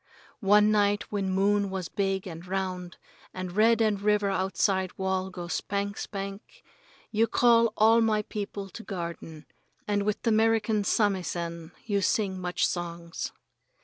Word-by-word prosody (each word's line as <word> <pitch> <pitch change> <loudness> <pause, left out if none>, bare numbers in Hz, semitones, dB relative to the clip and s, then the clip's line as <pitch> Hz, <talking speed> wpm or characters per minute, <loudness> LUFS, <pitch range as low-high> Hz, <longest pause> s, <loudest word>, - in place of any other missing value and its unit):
One 210 0 +5
night 205 -1 +1
when 200 -2 -1
moon 200 +1 +2
was 190 -2 -4
big 195 0 -1
and 165 -2 -7
round 185 -2 -3 0.4
and 185 -1 -4
red 225 +4 +4
and 210 -3 +1
river 210 -1 +2
outside 190 0 0
wall 190 0 -1
go 180 -2 -7
spank, 200 +3 -2
spank, 200 - -7 0.5
you 225 +1 +3
call 230 -1 +4
all 225 +2 +5
my 215 -1 +2
people 205 -2 -5
to - - -8
garden, 170 -5 -6 0.4
and 205 -1 +1
with 210 0 -2
the 230 - +2
'Merican 220 -1 +2
samisen 175 -5 -1
you 200 -3 0
sing 190 -1 0
much 180 -1 0
songs. 170 -1 -4
200 Hz, 145 wpm, -28 LUFS, 185-210 Hz, 0.5 s, One